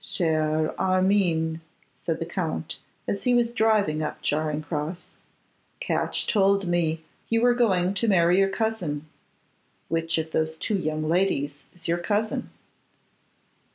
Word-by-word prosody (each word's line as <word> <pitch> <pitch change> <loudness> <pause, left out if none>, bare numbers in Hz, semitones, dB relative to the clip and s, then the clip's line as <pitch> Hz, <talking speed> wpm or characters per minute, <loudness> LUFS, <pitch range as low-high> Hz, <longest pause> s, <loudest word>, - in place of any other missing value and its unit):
'Cher 155 -2 +1
Armine,' 185 -4 +2 0.5
said 165 -2 +1
the 165 - -3
Count, 165 -2 -3 0.3
as 200 - -2
he 250 -1 +4
was 235 -1 +2
driving 215 -9 +2
up 150 - -3
Charing 155 0 0
cross, 155 +3 -4 0.7
'Catch - - -1
told 200 -2 +3
me 165 -2 0 0.3
you 230 - +3
were 245 +1 +4
going 195 -6 +2
to 230 +3 0
marry 175 -2 +4
your 195 0 +4
cousin. 190 -9 -2 0.8
Which 165 0 0
of 160 0 -2
those 160 0 -1
two 210 - -1
young 155 -4 -1
ladies 155 -5 +1 0.2
is 170 -1 -9
your 170 +1 +1
cousin? 210 +5 -1
175 Hz, 135 wpm, -26 LUFS, 155-200 Hz, 0.8 s, he